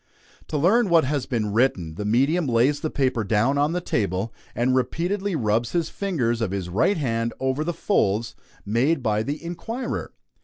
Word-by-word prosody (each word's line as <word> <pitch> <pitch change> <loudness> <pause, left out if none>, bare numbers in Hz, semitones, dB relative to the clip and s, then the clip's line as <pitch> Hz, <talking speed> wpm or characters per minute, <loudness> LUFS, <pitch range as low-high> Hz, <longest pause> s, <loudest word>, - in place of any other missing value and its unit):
To 150 - -2
learn 200 +8 +3
what 170 -1 +5
has 140 -1 -1
been 110 -6 -1
written, 100 -9 +1
the 105 +6 -5
medium 140 +10 +2
lays 125 +4 +2
the 155 - -2
paper 130 -6 0
down 115 +7 +2
on 150 +3 +2
the 180 - 0
table, 100 - -1 0.2
and 125 +2 +1
repeatedly 180 +8 -1
rubs 115 -2 0
the 170 - +2
fingers 140 - -1
of 110 - 0
his 95 -2 -3
right 120 - +2
hand 115 -5 -1
over 130 +3 0
the 170 - -1
folds 115 - 0 0.3
made 125 +8 +1
by 105 -2 +1
the 145 +7 -4
inquirer. 225 +9 -4
130 Hz, 180 wpm, -24 LUFS, 110-165 Hz, 0.3 s, what